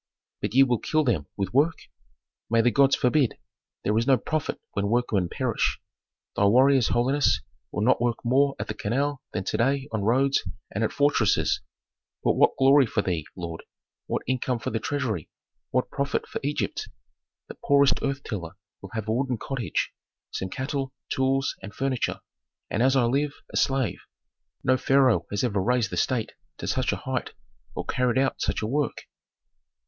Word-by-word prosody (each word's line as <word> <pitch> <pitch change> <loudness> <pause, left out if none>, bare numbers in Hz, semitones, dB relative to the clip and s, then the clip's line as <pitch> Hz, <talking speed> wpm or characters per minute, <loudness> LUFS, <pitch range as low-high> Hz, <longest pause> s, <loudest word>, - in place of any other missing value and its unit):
"But - - -3
ye 135 - +8
will 125 -4 +1
kill 155 0 +1
them 95 - 0
with 100 0 -2
work?" 150 +5 +4 0.7
"May 115 0 +4
the 120 +1 +3
gods 140 +1 +4
forbid! 130 0 +2 0.5
There 105 - +1
is 115 - -1
no 135 -2 +6
profit 155 +2 -2
when 100 0 -1
workmen 105 -5 +1
perish. - - 0 0.6
Thy 100 - +3
warriors, 130 +4 +5
holiness, 135 +4 +2 0.3
will 105 - -1
not 125 +1 +3
work 120 -1 +1
more 135 +3 +3
at - - -4
the - - -3
canal 135 +7 -1
than 95 - -3
to 105 - -2
day 135 +4 +1
on 110 - -1
roads 135 +6 +3 0.3
and 105 - -1
at 110 - +1
fortresses 145 -7 +2 0.6
but - - +3
what - - +3
glory 135 0 +6
for 105 -2 0
thee, 85 -5 -2
lord! 85 -2 -6 0.5
what - - -2
income 130 0 0
for 115 - -4
the 115 - -1
treasury, 120 - -2 0.4
what 125 - 0
profit 140 0 -1
for - - -4
Egypt! 145 +2 -2 0.6
The - - -10
poorest 140 -1 +4
earth 140 0 -2
tiller 90 -6 -5 0.3
will 100 - -9
have 110 -2 -4
a - - 0
wooden 130 0 0
cottage, 130 0 -2 0.4
some 95 - -3
cattle, 135 +4 -3
tools, 135 +1 +1
and 100 +2 -9
furniture, 135 -2 -1 0.5
and 110 - 0
as 130 +2 +4
I 130 - +4
live, 140 +5 +1 0.2
a - - -5
slave. 135 -7 +1 0.6
No 130 0 +3
pharaoh 135 -3 +3
has 100 +2 -1
ever 105 -6 +1
raised 120 0 +1
the - - -3
state 120 -4 0 0.3
to - - -6
such - - 0
a - - 0
height - - -3 0.4
or - - -4
carried 125 -1 +1
out 135 0 +1
such - - -1
a - - 0
work. 140 +2 -1
125 Hz, 175 wpm, -26 LUFS, 110-135 Hz, 0.7 s, ye